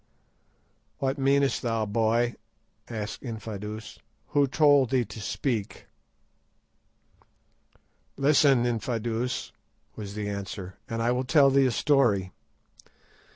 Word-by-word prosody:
"What 135 +1 -1
meanest 140 0 +2
thou, 115 -3 -1
boy?" 115 +3 +1 0.6
asked 110 -2 -5
Infadoos; 110 -2 -7 0.3
"who 145 -1 +3
told 145 -2 +4
thee 125 -2 +1
to 105 +1 -9
speak?" 110 -1 -3 2.3
"Listen, 140 -3 +4
Infadoos," 115 +1 -2 0.4
was 100 -2 -7
the 105 -1 -3
answer, 100 -2 -6
"and 115 0 -2
I 120 - +2
will 125 +1 0
tell 140 +1 +5
thee 135 0 +4
a - - 0
story. 115 -9 +2
120 Hz, 105 wpm, -27 LUFS, 105-135 Hz, 2.3 s, tell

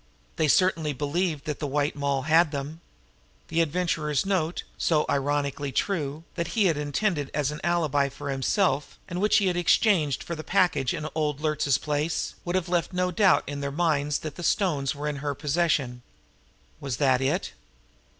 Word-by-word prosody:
They 155 - +2
certainly 160 -2 +2
believed 150 +2 -1
that 150 -2 -3
the 150 - -2
White 145 +1 0
Moll 140 -2 -1
had 160 +1 +4
them. 145 +3 -5 0.7
The 165 +1 +2
Adventurer's 155 -3 0
note, 180 -4 -1
so 155 -3 +1
ironically 140 0 -1
true, 155 -3 -2
that 170 +5 -4
he 210 - +4
had 170 -4 +3
intended 150 +1 -1
as 150 -1 0
an 150 - -7
alibi 150 -5 +1
for 140 - -6
himself, 145 +4 0
and 180 +1 -4
which 210 - +4
he 205 - +2
had 180 -2 +1
exchanged 175 - +2
for 170 - -5
the 155 -1 -6
package 180 -9 +2
in 155 - -4
old 150 -3 -1
Luertz's 150 -3 +1
place, 150 +2 -2
would 175 +1 -2
have 185 -2 0
left 175 0 0
no 180 0 0
doubt 190 +2 +4
in 145 0 -5
their 140 0 -3
minds 150 -2 +1
but - - -13
that 155 -2 -5
the 175 - -6
stones 150 -9 0
were 145 +1 -4
in 145 -1 -2
her 145 0 -3
possession. 145 -5 0 0.8
Was 135 -4 -4
that 130 -3 +3
it? 150 +8 0
150 Hz, 180 wpm, -26 LUFS, 140-175 Hz, 0.8 s, had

